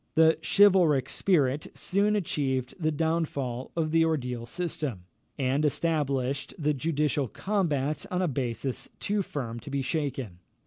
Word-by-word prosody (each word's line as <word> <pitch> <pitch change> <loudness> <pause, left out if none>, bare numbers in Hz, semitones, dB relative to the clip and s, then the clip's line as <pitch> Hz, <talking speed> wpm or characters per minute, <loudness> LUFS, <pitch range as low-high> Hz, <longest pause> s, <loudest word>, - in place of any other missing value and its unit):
The 160 0 +5
chivalric 180 - +5
spirit 150 -6 +1
soon 205 +3 +1
achieved 135 -9 -1
the 155 -2 +1
downfall 145 -6 -1
of 160 -2 0
the 165 0 +4
ordeal 125 -7 -1
system, 150 - -3 0.3
and 135 +1 +1
established 140 -4 0
the 150 -3 +1
judicial 150 -1 0
combat 155 - -1
on 180 - -1
a - - +2
basis 130 -2 -3
too 205 0 0
firm 120 -10 -4
to 145 - -10
be 140 -1 -1
shaken. 135 - -3
150 Hz, 135 wpm, -28 LUFS, 130-165 Hz, 0.3 s, The